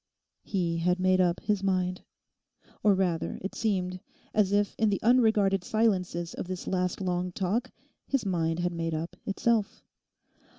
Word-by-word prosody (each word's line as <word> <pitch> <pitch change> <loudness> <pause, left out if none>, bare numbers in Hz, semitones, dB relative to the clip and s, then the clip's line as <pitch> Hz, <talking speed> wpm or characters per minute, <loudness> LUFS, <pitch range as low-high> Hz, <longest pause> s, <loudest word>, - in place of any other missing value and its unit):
He 175 -4 -1
had 180 +2 +1
made 185 0 +3
up 175 -1 +2
his 210 -2 0
mind. 185 -2 0 0.8
Or, 205 -2 +4
rather, 180 -4 -1
it 195 - -4
seemed 185 -5 -1 0.3
as 205 -3 +3
if 205 0 +2
in 220 -1 +3
the 200 - 0
unregarded 220 -5 +4
silences 185 -6 0
of - - -5
this 185 -1 -5
last 180 0 -1
long 180 -1 -1
talk 205 +8 -1 0.4
his 275 -6 0
mind 165 -4 0
had 175 0 0
made 165 -1 -2
up 165 +3 -4
itself. 215 +1 0
185 Hz, 155 wpm, -28 LUFS, 175-205 Hz, 0.8 s, Or